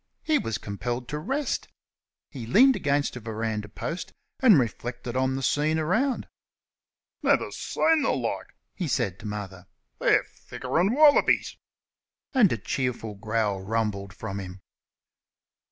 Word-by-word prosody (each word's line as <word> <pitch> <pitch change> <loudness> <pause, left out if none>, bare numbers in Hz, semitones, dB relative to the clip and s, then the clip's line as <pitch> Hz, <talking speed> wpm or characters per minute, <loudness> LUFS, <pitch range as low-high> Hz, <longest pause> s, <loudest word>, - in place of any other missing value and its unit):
He 310 -2 +2
was 115 - -2
compelled 120 +4 -4
to 150 - -3
rest. 275 - -2 0.6
He 120 -5 -7
leaned 255 - +6
against 145 -2 0
a - - -5
verandah 110 -1 -3
post 165 - -5 0.3
and 230 - +7
reflected 120 +1 -3
on 130 0 +1
the 135 - -3
scene 150 +4 +2
around. 220 - 0 0.9
"Never - - +2
see - - -2 0.2
th' - - +1
like," - - -3 0.3
he 180 - -3
said 115 -9 -1
to - - -7
Mother. 95 -3 -6 0.3
"They're - - +4 0.3
thicker'n 170 - 0
wallabies!" 295 0 +5 0.8
And 240 - +5
a - - 0
cheerful 115 0 -3
growl 105 -1 -1
rumbled 105 -2 -2
from 100 +1 -6
him. 95 -1 -8
120 Hz, 135 wpm, -26 LUFS, 105-160 Hz, 0.9 s, and